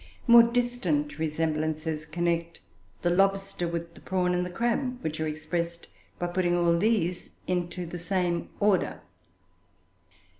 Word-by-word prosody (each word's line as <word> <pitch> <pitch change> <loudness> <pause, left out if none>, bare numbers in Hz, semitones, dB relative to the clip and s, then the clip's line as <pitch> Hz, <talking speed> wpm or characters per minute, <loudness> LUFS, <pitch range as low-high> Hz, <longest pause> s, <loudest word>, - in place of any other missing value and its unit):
More 235 -1 +9
distant 235 -12 0
resemblances 155 0 -1
connect 170 0 -1 0.4
the 175 - +3
lobster 195 -1 +1
with 170 0 -4
the - - -15
prawn 180 -1 0
and 180 0 +1
the 180 - -4
crab, 240 +6 -1
which 155 0 -3
are 155 - 0
expressed 170 +2 -3 0.3
by 175 - -2
putting 175 0 +1
all 170 -1 +3
these 180 -2 +1 0.2
into 180 0 -2
the 175 +1 -6
same 175 -1 -1
order. 200 -3 +2
175 Hz, 135 wpm, -28 LUFS, 165-190 Hz, 0.4 s, More